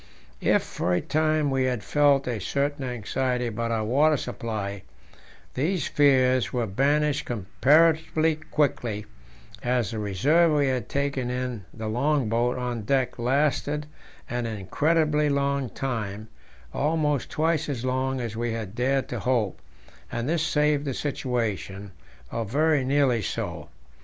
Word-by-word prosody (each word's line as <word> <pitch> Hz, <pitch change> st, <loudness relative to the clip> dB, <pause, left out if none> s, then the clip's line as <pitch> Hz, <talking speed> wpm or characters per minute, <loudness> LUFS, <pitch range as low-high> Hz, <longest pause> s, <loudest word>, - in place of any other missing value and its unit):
If -, -, +3 dB
for 90 Hz, 0 st, -1 dB
a -, -, +2 dB
time 155 Hz, -, +1 dB
we 135 Hz, -1 st, +1 dB
had 125 Hz, -5 st, -1 dB
felt 145 Hz, 0 st, +3 dB
a 120 Hz, -3 st, -2 dB
certain 140 Hz, +7 st, -1 dB
anxiety 125 Hz, +1 st, -1 dB
about 115 Hz, 0 st, -2 dB
our 110 Hz, -2 st, 0 dB
water 145 Hz, +6 st, +3 dB
supply, 105 Hz, -6 st, -4 dB, 0.7 s
these 165 Hz, +7 st, 0 dB
fears 130 Hz, -6 st, +3 dB
were 120 Hz, -2 st, 0 dB
banished 145 Hz, +8 st, +1 dB
comparatively 155 Hz, -, +2 dB
quickly, 120 Hz, -9 st, -1 dB, 0.6 s
as 120 Hz, -2 st, 0 dB
the 110 Hz, -, -4 dB
reserve 145 Hz, -, +3 dB
we 145 Hz, -1 st, +3 dB
had 130 Hz, -2 st, -2 dB
taken 140 Hz, -3 st, -1 dB
in 125 Hz, -5 st, -3 dB
the 110 Hz, -1 st, -6 dB
long 130 Hz, +2 st, +1 dB
boat 120 Hz, +3 st, +1 dB
on 125 Hz, -2 st, -3 dB
deck 130 Hz, +3 st, 0 dB
lasted 145 Hz, +3 st, +1 dB, 0.4 s
an 120 Hz, -1 st, -2 dB
incredibly 150 Hz, -, +1 dB
long 140 Hz, -2 st, 0 dB
time, 110 Hz, -5 st, -4 dB, 0.4 s
almost 150 Hz, -2 st, 0 dB
twice 160 Hz, -1 st, 0 dB
as 130 Hz, -3 st, -3 dB
long 130 Hz, +1 st, 0 dB
as 115 Hz, -3 st, -4 dB
we 120 Hz, 0 st, -2 dB
had 110 Hz, -4 st, -5 dB
dared 130 Hz, +3 st, 0 dB
to 120 Hz, -, -3 dB
hope, 110 Hz, -2 st, 0 dB, 0.5 s
and 120 Hz, +1 st, -2 dB
this 165 Hz, +1 st, +1 dB
saved 150 Hz, -2 st, +2 dB
the 135 Hz, -3 st, -2 dB
situation, 110 Hz, -8 st, -3 dB, 0.4 s
or 115 Hz, -, -2 dB
very 145 Hz, +6 st, +2 dB
nearly 130 Hz, -3 st, +2 dB
so. -, -, -4 dB
130 Hz, 140 wpm, -26 LUFS, 115-145 Hz, 0.7 s, If